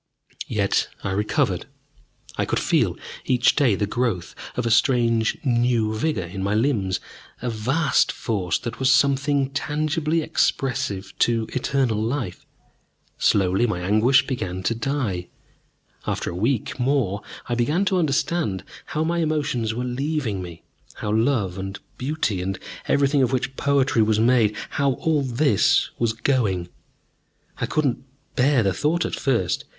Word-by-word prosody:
Yet -, -, +1 dB, 0.2 s
I 95 Hz, -, -2 dB
recovered. 105 Hz, +2 st, 0 dB, 0.7 s
I -, -, 0 dB
could -, -, -1 dB
feel -, -, +1 dB, 0.3 s
each 125 Hz, -1 st, +3 dB
day 130 Hz, -8 st, +3 dB
the 105 Hz, -, 0 dB
growth 110 Hz, -4 st, -2 dB, 0.2 s
of 125 Hz, -, -1 dB
a 115 Hz, -, +1 dB
strange 115 Hz, -1 st, +3 dB
new 120 Hz, -3 st, +2 dB
vigor 110 Hz, -, -1 dB
in 90 Hz, +3 st, -6 dB
my 100 Hz, +2 st, 0 dB
limbs, 105 Hz, -6 st, +1 dB, 0.4 s
a 125 Hz, 0 st, -2 dB
vast 135 Hz, +8 st, +2 dB
force 100 Hz, -6 st, -1 dB
that 120 Hz, -1 st, -6 dB
was 130 Hz, +1 st, +3 dB
something 140 Hz, 0 st, +2 dB
tangibly 155 Hz, +3 st, 0 dB
expressive 105 Hz, -10 st, -1 dB
to 115 Hz, -2 st, +2 dB
eternal 130 Hz, -4 st, 0 dB
life. 115 Hz, -5 st, -3 dB, 0.7 s
Slowly 95 Hz, +3 st, +3 dB
my 90 Hz, -5 st, -2 dB
anguish 110 Hz, +8 st, +4 dB
began 95 Hz, -8 st, -3 dB
to 105 Hz, -, +1 dB
die. 115 Hz, -8 st, -2 dB, 0.8 s
After -, -, -2 dB
a -, -, -7 dB
week 115 Hz, +5 st, -1 dB
more, 125 Hz, -6 st, +1 dB, 0.3 s
I 120 Hz, -, -1 dB
began 145 Hz, +11 st, +1 dB
to 190 Hz, -2 st, +2 dB
understand 140 Hz, -, 0 dB, 0.2 s
how 155 Hz, -, -2 dB
my 170 Hz, +1 st, 0 dB
emotions 145 Hz, -8 st, 0 dB
were 125 Hz, -, -2 dB
leaving 125 Hz, -4 st, -2 dB
me, 85 Hz, -1 st, -9 dB, 0.3 s
how 105 Hz, -, -3 dB
love 110 Hz, -5 st, +1 dB
and 95 Hz, +1 st, -5 dB, 0.2 s
beauty 130 Hz, -8 st, -1 dB
and 95 Hz, +1 st, -3 dB, 0.3 s
everything 140 Hz, 0 st, +3 dB
of 130 Hz, -, +2 dB
which 130 Hz, +1 st, -1 dB
poetry 135 Hz, -4 st, +2 dB
was 110 Hz, 0 st, +2 dB
made 115 Hz, -2 st, +3 dB, 0.2 s
how 140 Hz, -2 st, +1 dB
all 155 Hz, +3 st, 0 dB
this 125 Hz, -4 st, +2 dB
was 115 Hz, -2 st, +1 dB
going. 110 Hz, -8 st, 0 dB, 0.9 s
I -, -, -1 dB
could 155 Hz, -, 0 dB
not 125 Hz, -3 st, +1 dB, 0.4 s
bear 130 Hz, -1 st, +3 dB
the 95 Hz, -2 st, +1 dB
thought 160 Hz, -, 0 dB
at -, -, -4 dB
first. 105 Hz, -10 st, 0 dB
120 Hz, 145 wpm, -23 LUFS, 105-140 Hz, 0.9 s, anguish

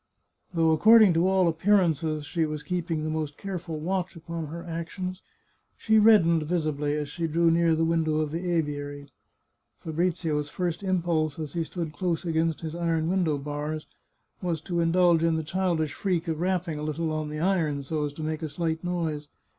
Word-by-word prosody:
Though 165 Hz, -1 st, +4 dB
according 215 Hz, +3 st, +7 dB
to 165 Hz, +3 st, +3 dB
all 190 Hz, -2 st, +3 dB
appearances 165 Hz, -4 st, +2 dB
she 165 Hz, +3 st, -1 dB
was 150 Hz, -1 st, -5 dB
keeping 165 Hz, -1 st, -2 dB
the 155 Hz, -, -2 dB
most 155 Hz, -2 st, -3 dB
careful 180 Hz, -5 st, -5 dB
watch 185 Hz, +3 st, -2 dB
upon 165 Hz, -1 st, -6 dB
her 170 Hz, +3 st, -7 dB
actions, 180 Hz, +3 st, -5 dB, 0.6 s
she 220 Hz, -1 st, +3 dB
reddened 200 Hz, -7 st, +5 dB
visi 155 Hz, 0 st, 0 dB
bly 145 Hz, 0 st, -3 dB
as 150 Hz, -1 st, -2 dB
she 165 Hz, +3 st, -3 dB
drew 165 Hz, +1 st, +3 dB
near 165 Hz, -1 st, +3 dB
the 165 Hz, +1 st, +1 dB
window 160 Hz, -2 st, +1 dB
of 155 Hz, -1 st, -1 dB
the 175 Hz, +3 st, -3 dB
aviary. 145 Hz, -3 st, -3 dB, 0.7 s
Fabrizio's 160 Hz, -2 st, -1 dB
first 175 Hz, +1 st, -2 dB
impulse, 170 Hz, -5 st, 0 dB
as 155 Hz, -3 st, -5 dB
he 170 Hz, -, 0 dB
stood 160 Hz, -1 st, -5 dB
close 175 Hz, +2 st, -2 dB
against 165 Hz, -1 st, 0 dB
his 160 Hz, -1 st, -5 dB
iron 165 Hz, -1 st, 0 dB
window 175 Hz, -6 st, +1 dB
bars, 150 Hz, +2 st, -4 dB, 0.6 s
was 175 Hz, -3 st, -1 dB
to 175 Hz, 0 st, -2 dB
indulge 170 Hz, 0 st, +4 dB
in 165 Hz, -1 st, +3 dB
the 160 Hz, -, -1 dB
childish 170 Hz, -2 st, -1 dB
freak 180 Hz, -3 st, -1 dB
of 160 Hz, -1 st, -2 dB
rapping 175 Hz, -3 st, -1 dB
a -, -, -5 dB
little 155 Hz, +1 st, -2 dB
on 155 Hz, -1 st, -2 dB
the 150 Hz, 0 st, -5 dB
iron, 160 Hz, -5 st, +1 dB
so 150 Hz, +2 st, -2 dB
as 145 Hz, -1 st, -3 dB
to 155 Hz, -, -7 dB
make 155 Hz, 0 st, -3 dB
a 160 Hz, -, -3 dB
slight 160 Hz, +1 st, -2 dB
noise. 165 Hz, -4 st, -2 dB
165 Hz, 185 wpm, -27 LUFS, 155-175 Hz, 0.7 s, according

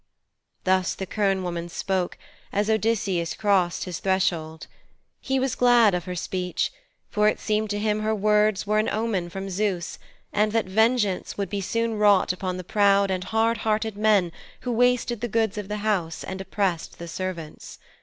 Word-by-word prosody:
Thus 185 Hz, -1 st, +2 dB
the 190 Hz, -, -4 dB
quern 195 Hz, -1 st, 0 dB
woman 175 Hz, -1 st, -4 dB
spoke, 185 Hz, +1 st, -2 dB, 0.3 s
as 205 Hz, +2 st, +1 dB
Odysseus 200 Hz, -6 st, 0 dB
crossed 190 Hz, -5 st, +1 dB
his 180 Hz, -3 st, -5 dB
threshold. 170 Hz, -5 st, -1 dB, 0.5 s
He 265 Hz, 0 st, -1 dB
was 260 Hz, -1 st, 0 dB
glad 240 Hz, -4 st, +5 dB
of 175 Hz, -2 st, -2 dB
her 180 Hz, -, -4 dB
speech, 180 Hz, +1 st, -2 dB, 0.4 s
for 210 Hz, 0 st, +3 dB
it 215 Hz, -, +1 dB
seemed 215 Hz, 0 st, 0 dB
to 205 Hz, -, -1 dB
him 210 Hz, 0 st, 0 dB
her 215 Hz, +1 st, 0 dB
words 210 Hz, -1 st, +2 dB
were 215 Hz, +1 st, +2 dB
an 215 Hz, -, +1 dB
omen 215 Hz, -6 st, -1 dB
from 195 Hz, +2 st, -6 dB
Zeus, 190 Hz, -2 st, -2 dB, 0.3 s
and 210 Hz, +1 st, +2 dB
that 225 Hz, -1 st, +2 dB
vengeance 215 Hz, 0 st, +1 dB
would 200 Hz, 0 st, -3 dB
soon 230 Hz, +4 st, 0 dB
be 220 Hz, -, -3 dB
wrought 205 Hz, -3 st, +4 dB
upon 185 Hz, 0 st, -4 dB
the 185 Hz, -, -6 dB
proud 200 Hz, +1 st, +3 dB
and 185 Hz, 0 st, -2 dB
hard 225 Hz, +2 st, +1 dB
hearted 220 Hz, 0 st, 0 dB
men 205 Hz, -4 st, +3 dB, 0.3 s
who 250 Hz, -, -3 dB
wasted 240 Hz, -1 st, +2 dB
the 240 Hz, -, -1 dB
goods 220 Hz, -2 st, 0 dB
of 205 Hz, -, -6 dB
the 210 Hz, +1 st, -3 dB
house 175 Hz, -7 st, -1 dB
and 190 Hz, 0 st, -5 dB
oppressed 190 Hz, -4 st, -2 dB
the 170 Hz, -, -8 dB
servants. 170 Hz, -2 st, -6 dB
200 Hz, 175 wpm, -25 LUFS, 185-215 Hz, 0.5 s, glad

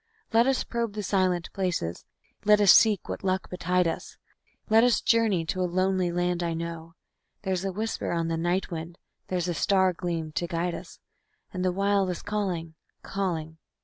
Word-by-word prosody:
Let 230 Hz, +2 st, +5 dB
us 270 Hz, -1 st, +2 dB
probe 235 Hz, -3 st, -3 dB
the 210 Hz, 0 st, -4 dB
silent 185 Hz, -3 st, 0 dB
places, 175 Hz, -, -2 dB, 0.4 s
let 210 Hz, 0 st, +5 dB
us 205 Hz, -3 st, +8 dB
seek 215 Hz, -5 st, +4 dB
what -, -, -5 dB
luck 190 Hz, -1 st, -1 dB
betide 180 Hz, 0 st, +1 dB
us; 165 Hz, -, -5 dB, 0.5 s
Let 225 Hz, +1 st, +5 dB
us 245 Hz, -1 st, +4 dB
journey 220 Hz, -7 st, +2 dB
to 185 Hz, +3 st, -2 dB
a 180 Hz, -, 0 dB
lonely 185 Hz, 0 st, +1 dB
land 175 Hz, 0 st, 0 dB
I 170 Hz, -1 st, -1 dB
know. 165 Hz, 0 st, -6 dB, 0.5 s
There's 190 Hz, -2 st, -1 dB
a 195 Hz, -, -1 dB
whisper 220 Hz, +4 st, -3 dB
on 165 Hz, -1 st, 0 dB
the 165 Hz, -, -1 dB
night 175 Hz, +4 st, -1 dB
wind, 165 Hz, +1 st, -6 dB, 0.3 s
there's 180 Hz, -1 st, -1 dB
a 175 Hz, -, 0 dB
star 190 Hz, +4 st, +3 dB
agleam 165 Hz, -3 st, -3 dB
to 175 Hz, +3 st, -2 dB
guide 170 Hz, +1 st, -1 dB
us, -, -, -9 dB, 0.6 s
And 185 Hz, -1 st, -2 dB
the 185 Hz, -, +2 dB
Wild 195 Hz, 0 st, +1 dB
is 180 Hz, -, -4 dB
calling, 185 Hz, -6 st, -2 dB, 0.3 s
calling... 160 Hz, -5 st, -3 dB
180 Hz, 180 wpm, -27 LUFS, 170-195 Hz, 0.6 s, us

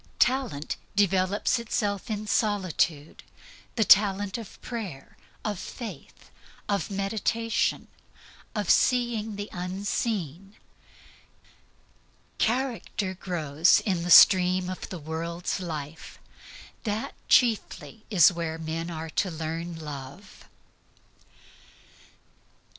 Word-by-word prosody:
Talent 250 Hz, -, 0 dB, 0.2 s
develops 195 Hz, +2 st, +2 dB
itself 210 Hz, -2 st, -2 dB
in 215 Hz, -1 st, -3 dB
solitude 185 Hz, -8 st, 0 dB, 0.5 s
the 225 Hz, -, +3 dB
talent 200 Hz, -1 st, +4 dB
of 225 Hz, -, -11 dB
prayer, 200 Hz, -, -7 dB, 0.3 s
of 205 Hz, -4 st, -2 dB
faith, 205 Hz, -, -9 dB, 0.4 s
of 200 Hz, 0 st, -1 dB
meditation, 215 Hz, +3 st, -1 dB, 0.7 s
of -, -, +1 dB
seeing 235 Hz, -4 st, +2 dB
the 205 Hz, 0 st, -5 dB
unseen; 190 Hz, -, -3 dB, 1.8 s
character 230 Hz, -5 st, -1 dB
grows 165 Hz, -3 st, +2 dB
in 185 Hz, -5 st, -1 dB
the 175 Hz, -, -4 dB
stream 185 Hz, 0 st, +7 dB
of 185 Hz, -, -7 dB
the 185 Hz, -, -5 dB
world's 165 Hz, +3 st, -4 dB
life. 160 Hz, -3 st, -7 dB, 0.7 s
That 215 Hz, 0 st, -3 dB, 0.2 s
chiefly 230 Hz, -2 st, +2 dB
is 185 Hz, -4 st, +6 dB
where 165 Hz, -2 st, -3 dB
men 165 Hz, +1 st, -4 dB
are 160 Hz, -1 st, -6 dB
to 190 Hz, -, 0 dB
learn 165 Hz, +1 st, -4 dB
love. 150 Hz, +4 st, -9 dB
190 Hz, 90 wpm, -27 LUFS, 165-210 Hz, 1.8 s, stream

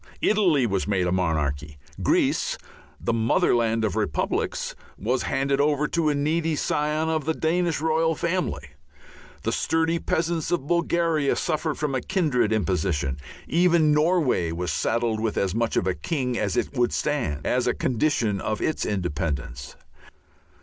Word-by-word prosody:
Italy 180 Hz, -, +3 dB
was 100 Hz, -4 st, -1 dB
made 95 Hz, -3 st, +1 dB
a 90 Hz, -, 0 dB
monarchy; 75 Hz, -5 st, -1 dB, 0.2 s
Greece, -, -, +1 dB, 0.4 s
the 115 Hz, -, -1 dB
motherland 115 Hz, 0 st, +2 dB
of 100 Hz, -, -2 dB
republics, -, -, -1 dB, 0.2 s
was 125 Hz, +5 st, 0 dB
handed 140 Hz, +1 st, 0 dB
over 150 Hz, 0 st, +2 dB
to 165 Hz, -2 st, +1 dB
a 145 Hz, -, +1 dB
needy 155 Hz, +2 st, 0 dB
scion 150 Hz, +2 st, 0 dB
of 160 Hz, -2 st, -1 dB
the 160 Hz, 0 st, 0 dB
Danish 170 Hz, 0 st, 0 dB
royal 160 Hz, +1 st, +1 dB
family; 180 Hz, +4 st, -2 dB, 0.7 s
the -, -, 0 dB
sturdy 165 Hz, +1 st, +1 dB
peasants 165 Hz, -1 st, -1 dB
of 175 Hz, -6 st, -1 dB
Bulgaria 170 Hz, -3 st, +1 dB
suffered 155 Hz, -2 st, -1 dB
from 150 Hz, -2 st, -2 dB
a 130 Hz, -, 0 dB
kindred 150 Hz, -, +1 dB
imposition. 90 Hz, -9 st, 0 dB, 0.3 s
Even 170 Hz, -1 st, +3 dB
Norway 150 Hz, -, +2 dB
was 85 Hz, 0 st, -2 dB
saddled 115 Hz, +5 st, 0 dB
with 110 Hz, -1 st, -2 dB
as 95 Hz, -2 st, 0 dB
much 115 Hz, +1 st, 0 dB
of -, -, +1 dB
a 95 Hz, -, +1 dB
king 130 Hz, -, -2 dB
as 105 Hz, -4 st, -1 dB
it -, -, -1 dB
would 120 Hz, -2 st, +2 dB
stand, 120 Hz, -, -1 dB
as 125 Hz, 0 st, +1 dB
a -, -, +2 dB
condition 115 Hz, -6 st, 0 dB
of 110 Hz, -1 st, -2 dB
its 155 Hz, -, -1 dB
independence. 75 Hz, -9 st, -3 dB
135 Hz, 150 wpm, -25 LUFS, 100-160 Hz, 0.7 s, Italy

